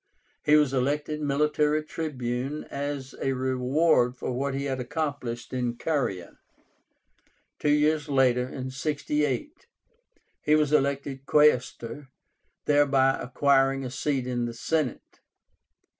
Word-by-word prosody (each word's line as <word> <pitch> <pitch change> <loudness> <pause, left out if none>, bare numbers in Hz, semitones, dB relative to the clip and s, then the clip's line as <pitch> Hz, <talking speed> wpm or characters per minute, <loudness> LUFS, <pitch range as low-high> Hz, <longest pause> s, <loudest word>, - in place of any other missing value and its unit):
He 150 0 +5
was 150 -3 +3
elected 145 +3 -1
Military 150 +1 +1
Tribune 140 -3 -4
as 140 -1 -4
a 135 - 0
reward 130 +1 +2
for - - -3
what 135 +2 -2
he 140 +1 -2
had 135 -2 -2
accomplished 130 -4 -4
in 125 -2 -2
Caria. 125 - -2 1.2
Two 150 - 0
years 150 +1 +2
later, 130 -2 +2
in 130 0 -6
68, 150 - -2 0.7
he 150 - +3
was 150 -1 +2
elected 140 -1 0
Quaestor, 140 -2 +2 0.6
thereby 140 -2 +4
acquiring 135 +1 +2
a 125 - -5
seat 135 0 -1
in 120 -1 -1
the 120 -1 -5
Senate. 155 +2 -2
140 Hz, 115 wpm, -27 LUFS, 130-150 Hz, 1.2 s, He